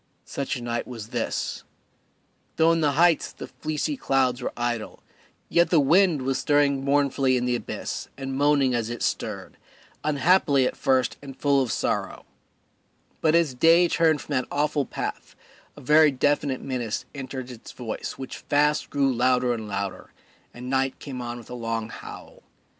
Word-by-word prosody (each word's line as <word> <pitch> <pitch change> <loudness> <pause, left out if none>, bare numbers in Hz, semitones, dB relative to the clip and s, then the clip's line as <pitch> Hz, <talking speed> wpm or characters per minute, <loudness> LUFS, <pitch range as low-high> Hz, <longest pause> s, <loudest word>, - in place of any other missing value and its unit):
Such 140 0 -3
a 120 - -6
night 120 0 -3
was 115 -3 -8
this. - - -3 0.9
Though 160 +1 +4
in 165 0 +1
the 145 -2 +2
heights 165 +1 +3
the - - -8
fleecy 155 - -3
clouds 130 - +1
were - - -3
idle, 120 -2 -3 0.4
yet 170 0 +3
the 165 - +4
wind 165 0 +4
was 135 0 0
stirring 145 -2 +2
mournfully 140 -2 +2
in 125 - -1
the 125 -1 +1
abyss - - -5
and 135 -1 -4
moaning 140 -2 +3
as 115 -2 -1
it 120 -1 -4
stirred, - - -3 0.5
unhappily 145 -2 +3
at - - -1
first 130 -2 +1
and 135 -2 -10
full 140 -1 +3
of 125 - -1
sorrow; - - -2 1.0
but 160 0 +3
as 165 -5 +3
day 165 +7 +5
turned 160 -2 +2
away - - -9
from 150 - -6
that 130 -2 0
awful 145 -1 0
path - - -5 0.4
a - - -10
very 150 +3 +6
definite 140 0 0
menace 125 -5 -3
entered 130 -2 -6
its 120 -2 -11
voice 115 -3 -5
which 130 - -7
fast 150 +1 +1
grew 140 -2 +1
louder 125 0 +2
and 110 -2 -5
louder, 100 -2 -4 0.4
and 125 +1 -9
night 135 0 0
came 130 -3 -7
on 120 0 -5
with 120 - -12
a - - -5
long 115 -2 -3
howl. - - -10
135 Hz, 170 wpm, -25 LUFS, 125-150 Hz, 1.0 s, very